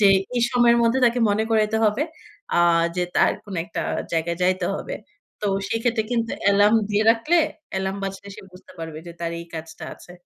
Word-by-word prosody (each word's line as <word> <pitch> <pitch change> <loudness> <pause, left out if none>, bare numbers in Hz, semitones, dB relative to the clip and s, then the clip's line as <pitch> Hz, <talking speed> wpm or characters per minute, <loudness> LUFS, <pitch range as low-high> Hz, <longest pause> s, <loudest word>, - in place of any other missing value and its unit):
যে 205 - +7 0.3
এই 240 - +2
সময়ের 240 -2 +4
মধ্যে 230 +3 +3
তাকে 240 0 +3
মনে 210 +2 +1
করাইতে 220 0 +2
হবে 215 +6 +2 0.5
আ - - +4 0.4
যে 180 - +1
তার - - +4
কোন 200 - -8
একটা 175 - -5 0.3
জায়গায় 170 +1 0
যাইতে 185 0 +1
হবে। - - -5 0.5
তো 210 - -2 0.2
সেক্ষেত্রে 225 0 0
কিন্তু 230 -1 0 0.2
এলার্ম 205 +2 +5
দিয়ে 210 +1 +2
রাখলে 235 +10 +2 0.4
এলার্ম 190 0 -2
বাজলে 195 +1 -6
সে - - -10
বুঝতে 180 - -15
পারবে 160 -1 -6
যে 170 - -8
তার 170 - -2
এই 170 - -10
কাজটা 160 0 -8
আছে। 175 - -14
205 Hz, 185 wpm, -23 LUFS, 180-230 Hz, 0.5 s, যে